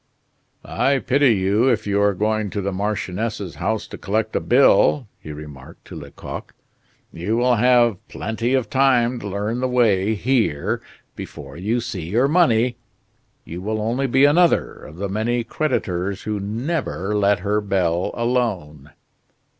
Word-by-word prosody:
"I 140 Hz, 0 st, +1 dB
pity 135 Hz, -2 st, +3 dB
you 100 Hz, +6 st, +2 dB
if 110 Hz, -3 st, 0 dB
you 100 Hz, 0 st, +1 dB
are 100 Hz, -1 st, +2 dB
going 110 Hz, +1 st, 0 dB
to 100 Hz, -, -3 dB
the 100 Hz, +1 st, -2 dB
marchioness's 100 Hz, 0 st, -3 dB
house 110 Hz, -1 st, -1 dB
to -, -, -10 dB
collect 110 Hz, +2 st, -2 dB
a -, -, +2 dB
bill," 135 Hz, 0 st, +4 dB
he 75 Hz, -, -8 dB
remarked 75 Hz, -3 st, -11 dB
to -, -, -10 dB
Lecoq. -, -, -9 dB, 0.6 s
"You 90 Hz, +7 st, -2 dB
will 125 Hz, 0 st, +3 dB
have 120 Hz, -2 st, +4 dB
plenty 115 Hz, +4 st, -2 dB
of 130 Hz, -4 st, 0 dB
time 125 Hz, -2 st, +2 dB
to 105 Hz, -, -6 dB
learn 105 Hz, +4 st, -2 dB
the 130 Hz, -, 0 dB
way 110 Hz, -5 st, +2 dB
here 110 Hz, -, 0 dB, 0.3 s
before 70 Hz, 0 st, -9 dB
you 110 Hz, +8 st, -1 dB
see 95 Hz, -9 st, -5 dB
your 120 Hz, +7 st, +2 dB
money. 125 Hz, -8 st, +2 dB, 0.7 s
You 85 Hz, +2 st, -7 dB
will 110 Hz, +2 st, -2 dB
only 120 Hz, +6 st, -1 dB
be 135 Hz, +3 st, +4 dB
another 170 Hz, +4 st, +3 dB
of 75 Hz, -, -13 dB
the 100 Hz, +4 st, -3 dB
many 115 Hz, +4 st, -1 dB
creditors 100 Hz, -, -2 dB
who 105 Hz, -1 st, -3 dB
never 110 Hz, -, -3 dB
let 100 Hz, -2 st, +2 dB
her 105 Hz, +1 st, 0 dB
bell 90 Hz, -3 st, 0 dB
alone." 100 Hz, -, -2 dB
110 Hz, 155 wpm, -21 LUFS, 100-125 Hz, 0.7 s, bill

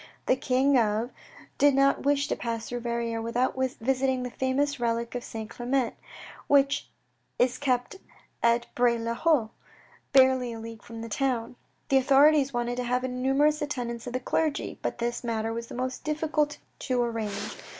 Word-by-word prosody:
The -, -, +3 dB
King 260 Hz, +1 st, +3 dB
of 220 Hz, +2 st, 0 dB, 0.5 s
did 285 Hz, -1 st, +5 dB
not 275 Hz, 0 st, +3 dB
wish 285 Hz, 0 st, +2 dB
to -, -, +1 dB
pass 230 Hz, -1 st, -4 dB
through 245 Hz, -, -4 dB
Verrieres 235 Hz, -1 st, -2 dB
without 240 Hz, +3 st, 0 dB
visiting 260 Hz, 0 st, 0 dB
the 250 Hz, -, -4 dB
famous 270 Hz, +3 st, 0 dB
relic 235 Hz, -1 st, -1 dB
of 245 Hz, -1 st, -4 dB
St. 220 Hz, -1 st, -6 dB
Clement, 245 Hz, +2 st, -1 dB, 0.5 s
which 280 Hz, 0 st, +3 dB, 0.5 s
is 250 Hz, 0 st, +2 dB
kept 255 Hz, +5 st, 0 dB, 0.4 s
at 235 Hz, 0 st, +3 dB
Bray 240 Hz, -1 st, +3 dB
le 230 Hz, 0 st, -2 dB
Haut' 245 Hz, -4 st, +2 dB, 0.6 s
barely 260 Hz, -2 st, +4 dB
a 225 Hz, -, -7 dB
league 225 Hz, 0 st, -8 dB
from 230 Hz, -1 st, -9 dB
the 230 Hz, -, -5 dB
town. 245 Hz, 0 st, -1 dB, 0.3 s
The 270 Hz, -, +5 dB
authorities 275 Hz, +1 st, +5 dB
wanted 240 Hz, -1 st, -2 dB
to 250 Hz, -, -1 dB
have 250 Hz, +1 st, 0 dB
a -, -, 0 dB
numerous 270 Hz, +4 st, +2 dB
attendance 245 Hz, -5 st, -4 dB
of 245 Hz, -, -5 dB
the 255 Hz, -, 0 dB
clergy, 305 Hz, +4 st, -1 dB
but -, -, -3 dB
this 240 Hz, +1 st, -2 dB
matter 225 Hz, -1 st, -1 dB
was 230 Hz, 0 st, -5 dB
the -, -, -9 dB
most 255 Hz, +1 st, -3 dB
difficult 305 Hz, -1 st, 0 dB, 0.2 s
to 255 Hz, -2 st, -1 dB
arrange. 225 Hz, -4 st, -3 dB
250 Hz, 170 wpm, -27 LUFS, 235-270 Hz, 0.6 s, did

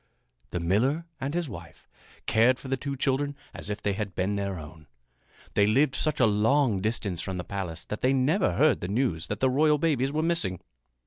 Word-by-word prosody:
The 90 Hz, -, -3 dB
miller 120 Hz, -, +1 dB
and 140 Hz, +4 st, -3 dB
his 175 Hz, -2 st, -1 dB
wife 115 Hz, -, -11 dB, 0.4 s
cared 115 Hz, +3 st, +4 dB
for 130 Hz, -, -9 dB
the 135 Hz, -, +1 dB
two 140 Hz, +2 st, -4 dB
children 140 Hz, +2 st, 0 dB, 0.2 s
as -, -, -6 dB
if 105 Hz, -, -4 dB
they 100 Hz, -, +1 dB
had 100 Hz, -2 st, -4 dB
been 100 Hz, +2 st, 0 dB
their 100 Hz, -2 st, -2 dB
own. 80 Hz, -1 st, -11 dB, 0.7 s
They 100 Hz, 0 st, +4 dB
lived 135 Hz, +5 st, +3 dB
such 150 Hz, +3 st, 0 dB
a 125 Hz, -, +6 dB
long 110 Hz, +1 st, +2 dB
distance 100 Hz, -5 st, -1 dB
from 95 Hz, -1 st, -4 dB
the 90 Hz, -, -3 dB
palace 90 Hz, -4 st, -4 dB
that 105 Hz, -, -5 dB
they 130 Hz, -, +3 dB
never 145 Hz, +9 st, +2 dB
heard 150 Hz, -1 st, +3 dB
the 90 Hz, -, -3 dB
news 100 Hz, -6 st, 0 dB
that 105 Hz, 0 st, -4 dB
the 130 Hz, -, +4 dB
royal 150 Hz, +3 st, +4 dB
babes 140 Hz, -4 st, +1 dB
were 155 Hz, +2 st, 0 dB
missing. 135 Hz, -, 0 dB
120 Hz, 205 wpm, -27 LUFS, 100-140 Hz, 0.7 s, a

